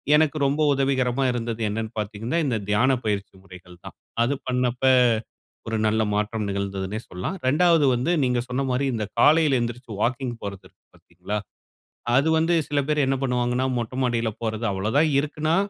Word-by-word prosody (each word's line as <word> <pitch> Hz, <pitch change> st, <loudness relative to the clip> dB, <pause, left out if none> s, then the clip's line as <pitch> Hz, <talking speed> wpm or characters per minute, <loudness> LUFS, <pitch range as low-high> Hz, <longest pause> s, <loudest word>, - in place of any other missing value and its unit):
எனக்கு 155 Hz, 0 st, +2 dB
ரொம்ப 145 Hz, +3 st, 0 dB
உதவிகரமா 135 Hz, -1 st, +1 dB
இருந்தது 115 Hz, -1 st, -3 dB
என்னன்னு 110 Hz, +1 st, -3 dB
பாத்தீங்கன்னா, 105 Hz, +7 st, -3 dB
இந்த 125 Hz, -, 0 dB
தியானப் 125 Hz, +4 st, +2 dB
பயிற்சி 100 Hz, -2 st, -2 dB
முறைகள் 90 Hz, -2 st, -14 dB
தான். -, -, -9 dB, 0.3 s
அது 125 Hz, +4 st, +1 dB
பண்ணப்ப, 125 Hz, 0 st, -1 dB, 0.8 s
ஒரு 110 Hz, 0 st, -1 dB
நல்ல 110 Hz, +1 st, +1 dB
மாற்றம் 105 Hz, +1 st, -1 dB
நிகழ்ந்ததுனே 100 Hz, +1 st, -3 dB
சொல்லலாம். 90 Hz, -, -4 dB
2வது 160 Hz, +2 st, +4 dB
வந்து 130 Hz, +8 st, 0 dB
நீங்க 125 Hz, -1 st, +1 dB
சொன்ன 130 Hz, +2 st, -1 dB
மாரி 130 Hz, +2 st, 0 dB
இந்த 110 Hz, -2 st, -2 dB
காலையில 150 Hz, 0 st, +5 dB
எந்திருசது 120 Hz, -2 st, -5 dB
வாக்கிங் 130 Hz, +1 st, -1 dB
போறது 100 Hz, -2 st, -6 dB
இருக்கு -, -, -35 dB
பாத்தீங்களா, 105 Hz, -, -6 dB, 0.8 s
அது 140 Hz, +4 st, +3 dB
வந்து 165 Hz, +2 st, +2 dB
சில 145 Hz, 0 st, +1 dB
பேர் 150 Hz, -2 st, +2 dB
என்ன 135 Hz, -, +1 dB
பண்ணுவாங்கன்னா 125 Hz, 0 st, 0 dB
மொட்டை 120 Hz, +2 st, -4 dB
மாடியில 115 Hz, -2 st, 0 dB
போறது 110 Hz, 0 st, -2 dB
அவ்வளவு 105 Hz, +6 st, -2 dB
தான் 155 Hz, 0 st, +4 dB
இருக்குன்னா, 155 Hz, +3 st, -1 dB
125 Hz, 160 wpm, -24 LUFS, 110-140 Hz, 0.8 s, காலையில